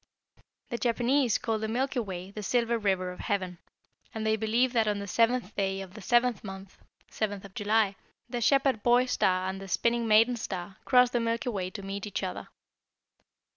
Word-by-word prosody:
"The 235 Hz, -3 st, -3 dB
Japanese 245 Hz, +1 st, +2 dB
call 225 Hz, -3 st, -2 dB
the 220 Hz, -, -2 dB
Milky 255 Hz, +4 st, -1 dB
Way 190 Hz, -4 st, -5 dB
the 210 Hz, -, -7 dB
Silver 235 Hz, +2 st, +1 dB
River 190 Hz, -3 st, 0 dB
of 180 Hz, -, -11 dB
Heaven, 185 Hz, -3 st, -2 dB, 0.6 s
and 220 Hz, 0 st, -3 dB
they 220 Hz, 0 st, +3 dB
believe 230 Hz, +4 st, +1 dB
that 225 Hz, -3 st, +2 dB
on 210 Hz, -1 st, +1 dB
the 200 Hz, -, -5 dB
seventh 230 Hz, +1 st, +1 dB
day 195 Hz, -1 st, -1 dB
of 190 Hz, -2 st, -8 dB
the 215 Hz, -, -10 dB
seventh 240 Hz, +2 st, +2 dB
month 195 Hz, -1 st, -9 dB, 0.3 s
(7th 205 Hz, -2 st, -3 dB
of 195 Hz, -, -12 dB
July), 205 Hz, -1 st, +1 dB, 0.3 s
the 240 Hz, -1 st, -4 dB
Shepherd 270 Hz, -2 st, +3 dB
boy 245 Hz, +2 st, +4 dB
star 185 Hz, -7 st, +1 dB
and 190 Hz, +1 st, -4 dB
the 195 Hz, -, -8 dB
Spinning 235 Hz, +4 st, +1 dB
maiden 225 Hz, +3 st, +5 dB
star 190 Hz, -3 st, -5 dB
cross 250 Hz, -2 st, +5 dB
the 240 Hz, -, +1 dB
Milky 230 Hz, +1 st, -1 dB
Way 190 Hz, -5 st, -3 dB
to 200 Hz, +1 st, -8 dB
meet 200 Hz, +1 st, -5 dB
each 205 Hz, -, -4 dB
other. 185 Hz, -, -4 dB
220 Hz, 190 wpm, -29 LUFS, 195-240 Hz, 0.6 s, maiden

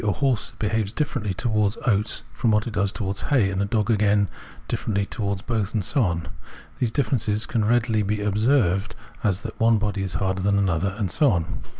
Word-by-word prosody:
a 105 Hz, -2 st, +2 dB
horse 125 Hz, +3 st, 0 dB
behaves 110 Hz, -2 st, 0 dB
differently 115 Hz, -7 st, -2 dB
towards 105 Hz, +1 st, 0 dB
oats 105 Hz, -3 st, +1 dB
from 120 Hz, -, 0 dB
what 105 Hz, 0 st, +3 dB
it 120 Hz, -, -5 dB
does 100 Hz, -2 st, +1 dB
towards 100 Hz, -2 st, -3 dB
hay, 115 Hz, -9 st, +2 dB
and 95 Hz, 0 st, -1 dB
a -, -, +1 dB
dog 110 Hz, +2 st, 0 dB
again 105 Hz, -1 st, +3 dB, 0.4 s
differently 100 Hz, -2 st, -1 dB
towards 100 Hz, -2 st, -3 dB
both, 110 Hz, -3 st, -2 dB
and 105 Hz, -4 st, 0 dB
so 140 Hz, -, +1 dB
on. 85 Hz, -5 st, 0 dB, 0.5 s
These 125 Hz, -, +1 dB
differences 110 Hz, -5 st, 0 dB
can 120 Hz, -7 st, 0 dB
as -, -, +1 dB
readily 115 Hz, -2 st, +2 dB
be 105 Hz, +1 st, -1 dB
observed 105 Hz, -2 st, +1 dB, 0.3 s
as 100 Hz, -1 st, +1 dB
that 110 Hz, -, -7 dB
one 115 Hz, 0 st, +4 dB
body 105 Hz, -1 st, -1 dB
is 95 Hz, -2 st, -3 dB
harder 95 Hz, +2 st, 0 dB
than 100 Hz, +1 st, +2 dB
another, 95 Hz, 0 st, 0 dB
and 100 Hz, -6 st, -1 dB
so 145 Hz, +4 st, +4 dB
on. 85 Hz, -4 st, -2 dB
105 Hz, 205 wpm, -24 LUFS, 100-115 Hz, 0.5 s, one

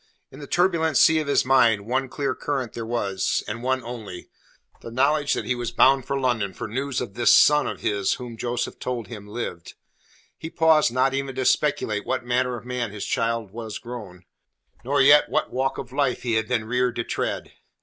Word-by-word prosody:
In -, -, -12 dB
the 145 Hz, -, -9 dB
turbulent 170 Hz, -4 st, +2 dB
sea 160 Hz, 0 st, +5 dB
of 155 Hz, -, -3 dB
his 145 Hz, -, +2 dB
mind, 115 Hz, -6 st, +3 dB
one 130 Hz, +3 st, -1 dB
clear 140 Hz, +1 st, -2 dB
current 135 Hz, -6 st, -3 dB
there 115 Hz, -1 st, -6 dB
was, 100 Hz, -5 st, -1 dB
and 115 Hz, +3 st, -5 dB
one 130 Hz, 0 st, -1 dB
only 115 Hz, -6 st, -8 dB, 0.5 s
the -, -, -8 dB
knowledge 140 Hz, +4 st, +1 dB
that -, -, -3 dB
he -, -, 0 dB
was 120 Hz, -2 st, -3 dB
bound 130 Hz, +2 st, +4 dB
for 140 Hz, -, -1 dB
London 115 Hz, -7 st, -1 dB
for -, -, -5 dB
news 130 Hz, +4 st, -3 dB
of 120 Hz, -6 st, -6 dB
this 115 Hz, +1 st, +3 dB
son 150 Hz, 0 st, +5 dB
of -, -, -5 dB
his 100 Hz, -2 st, 0 dB
whom 120 Hz, -2 st, -8 dB
Joseph 120 Hz, +1 st, -3 dB
told 125 Hz, -3 st, -4 dB
him 105 Hz, -4 st, -9 dB
lived. 105 Hz, -6 st, -6 dB, 0.6 s
He 160 Hz, -, -6 dB
paused 160 Hz, -5 st, +3 dB
not 130 Hz, +2 st, +2 dB
even 135 Hz, -1 st, -3 dB
to 130 Hz, -1 st, -2 dB
speculate 135 Hz, -9 st, +1 dB
what 130 Hz, -2 st, -2 dB
manner 125 Hz, 0 st, 0 dB
of 120 Hz, -, -12 dB
man 125 Hz, -2 st, -3 dB
his 100 Hz, 0 st, -6 dB
child 115 Hz, -3 st, -1 dB
was 110 Hz, -1 st, -6 dB
grown, 105 Hz, -7 st, -9 dB, 0.6 s
nor 135 Hz, +2 st, +2 dB
yet 145 Hz, +2 st, +6 dB
what -, -, -1 dB
walk 135 Hz, +1 st, -1 dB
of 130 Hz, -1 st, -7 dB
life 140 Hz, -2 st, 0 dB
he 120 Hz, -2 st, -1 dB
had 110 Hz, -1 st, 0 dB
been 115 Hz, -3 st, -1 dB
reared 125 Hz, +1 st, 0 dB
to 120 Hz, -, -2 dB
tread. -, -, -3 dB
125 Hz, 205 wpm, -24 LUFS, 115-135 Hz, 0.6 s, yet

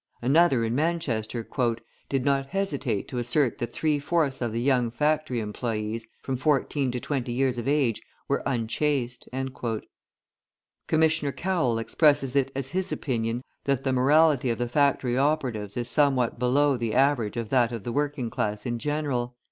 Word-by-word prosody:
{148c} -, -, -5 dB
Another, 145 Hz, -5 st, +4 dB
in 115 Hz, 0 st, -1 dB
Manchester, 125 Hz, -7 st, -1 dB, 0.6 s
"did 135 Hz, -2 st, 0 dB
not 135 Hz, -1 st, +1 dB
hesitate 140 Hz, -, -2 dB
to 125 Hz, -, -4 dB
assert 120 Hz, +2 st, +1 dB
that 120 Hz, -2 st, -3 dB
three 150 Hz, +1 st, 0 dB
fourths 145 Hz, -2 st, 0 dB
of 120 Hz, -2 st, -1 dB
the 115 Hz, -, -2 dB
young 125 Hz, -2 st, +2 dB
factory 150 Hz, +1 st, 0 dB
employees, 110 Hz, 0 st, -3 dB, 0.2 s
from 135 Hz, -, -2 dB
fourteen 135 Hz, 0 st, +1 dB
to 125 Hz, -, -3 dB
twenty 130 Hz, -2 st, -3 dB
years 125 Hz, 0 st, 0 dB
of 120 Hz, -, -5 dB
age, 140 Hz, -6 st, +1 dB, 0.3 s
were -, -, 0 dB
unchaste." 125 Hz, +1 st, -1 dB
{149a} 125 Hz, -4 st, -3 dB, 1.0 s
Commissioner 155 Hz, -2 st, +2 dB
Cowell 165 Hz, -9 st, 0 dB
expresses 135 Hz, +3 st, +2 dB
it 135 Hz, -1 st, +2 dB
as 135 Hz, -1 st, -3 dB
his 185 Hz, +4 st, -2 dB
opinion, 120 Hz, -2 st, -2 dB, 0.2 s
that 140 Hz, -2 st, 0 dB
the 130 Hz, -, +1 dB
morality 140 Hz, +1 st, +4 dB
of 115 Hz, -, 0 dB
the 120 Hz, -, -1 dB
factory 130 Hz, -1 st, +2 dB
operatives 125 Hz, -8 st, 0 dB
is 120 Hz, -1 st, -2 dB
somewhat 135 Hz, -4 st, +2 dB
below 140 Hz, +3 st, +3 dB
the 115 Hz, -2 st, -2 dB
average 130 Hz, -5 st, +2 dB
of 115 Hz, -2 st, -3 dB
that 120 Hz, -2 st, +3 dB
of 115 Hz, -4 st, -5 dB
the 120 Hz, -, -3 dB
working 145 Hz, -3 st, -1 dB
class 105 Hz, 0 st, -2 dB
in 120 Hz, -1 st, -2 dB
general. 140 Hz, -4 st, -2 dB
130 Hz, 165 wpm, -26 LUFS, 120-145 Hz, 1.0 s, Another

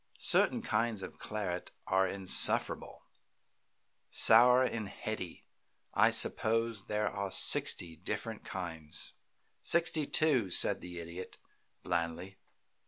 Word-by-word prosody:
"Certain -, -, +2 dB
kinds 110 Hz, -2 st, -2 dB
of -, -, -10 dB
claret 95 Hz, -5 st, -5 dB, 0.2 s
are 95 Hz, 0 st, +1 dB
insufferable 95 Hz, 0 st, 0 dB, 1.0 s
sour 125 Hz, +3 st, +6 dB
and 110 Hz, -5 st, -3 dB
heady. 95 Hz, -5 st, -7 dB, 0.5 s
I -, -, +4 dB
suppose 115 Hz, -2 st, +1 dB
there 105 Hz, 0 st, -1 dB
are 100 Hz, -1 st, -4 dB
sixty 85 Hz, -2 st, +2 dB
different 105 Hz, +5 st, -6 dB
kinds." 80 Hz, -5 st, -6 dB, 0.5 s
"Sixty 165 Hz, -3 st, +1 dB
two," 135 Hz, -11 st, +1 dB
said -, -, +3 dB
the 90 Hz, 0 st, -9 dB
Idiot, 85 Hz, +2 st, -8 dB, 0.5 s
blandly. 85 Hz, +2 st, -4 dB
100 Hz, 100 wpm, -31 LUFS, 90-115 Hz, 1.0 s, sour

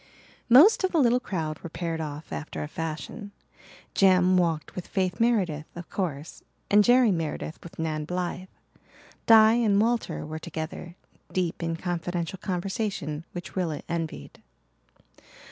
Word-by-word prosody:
Most 310 Hz, -, +7 dB
of 375 Hz, -, +1 dB
the 335 Hz, -, +1 dB
little 250 Hz, -4 st, +4 dB
crowd 160 Hz, -10 st, -4 dB
were 170 Hz, -, -8 dB
paired 165 Hz, -1 st, -3 dB
off 150 Hz, 0 st, -6 dB
after 155 Hz, -, -5 dB
a -, -, -5 dB
fashion. 165 Hz, +7 st, -6 dB, 0.6 s
Jem 185 Hz, -1 st, +4 dB
walked 165 Hz, -3 st, 0 dB
with 180 Hz, -, -6 dB
Faith 185 Hz, -2 st, -1 dB
Meredith, 190 Hz, -11 st, +1 dB
of 175 Hz, -1 st, -9 dB
course, 160 Hz, -5 st, -4 dB, 0.3 s
and 205 Hz, +1 st, +7 dB
Jerry 245 Hz, -1 st, +5 dB
Meredith 165 Hz, -2 st, -3 dB
with 170 Hz, -, -12 dB
Nan 155 Hz, -2 st, -2 dB
Blythe. 180 Hz, +2 st, -3 dB, 0.8 s
Di 220 Hz, -1 st, +8 dB
and 220 Hz, -4 st, +3 dB
Walter 235 Hz, +2 st, 0 dB
were 155 Hz, +1 st, -6 dB
together, 165 Hz, +1 st, -6 dB, 0.4 s
deep 180 Hz, -2 st, -1 dB
in 165 Hz, 0 st, -1 dB
confidential 175 Hz, +1 st, -3 dB
conversation 185 Hz, -5 st, -3 dB
which 175 Hz, -1 st, -7 dB
Rilla 170 Hz, -5 st, -2 dB
envied. 160 Hz, -, -5 dB
175 Hz, 140 wpm, -26 LUFS, 160-205 Hz, 0.8 s, Di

